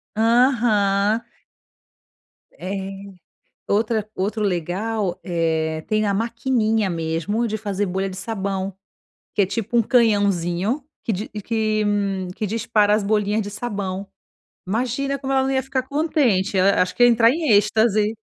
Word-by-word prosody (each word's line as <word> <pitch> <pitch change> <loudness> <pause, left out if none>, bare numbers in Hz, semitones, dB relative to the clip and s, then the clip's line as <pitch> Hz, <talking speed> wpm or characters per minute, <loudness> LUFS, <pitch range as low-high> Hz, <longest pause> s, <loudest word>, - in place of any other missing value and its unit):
Aham. 225 -3 +3 1.3
É. 190 +2 -5 0.9
Outra 215 +1 +1
outro 210 +3 -2
legal, 190 +2 -1
eh, 160 -3 -1
tem 215 0 +1
a 200 - +1
maquininha, 225 -1 0
mesmo, 170 +7 -1
de 220 - -2
fazer 205 -1 -2
bolha 190 +1 -2
de 190 - -8
sabão 195 -3 -3 0.6
que - - +2
é, - - +4
tipo, 225 +4 -2
um - - +6
canhãozinho 205 - +1 0.2
que - - -1
di 210 +2 -3
que 215 0 -1 0.5
que 215 - -2
dispara 210 0 +2
as 210 0 +2
bolhinhas 210 +1 +1
de 205 - -5
sabão. 200 -3 -4 0.6
Imagina 255 +7 -1
como 270 0 -3
ela 265 0 +3
não 270 - 0
ia 265 0 +1
ficar 265 0 -2
contente, 265 - +1
ela 195 +1 +4
acho 180 - -3
que - - +1
ia - - +7
entrar 230 -1 +5
em 310 +1 -1
êxtase. 215 +1 +3
215 Hz, 140 wpm, -22 LUFS, 195-230 Hz, 1.3 s, ia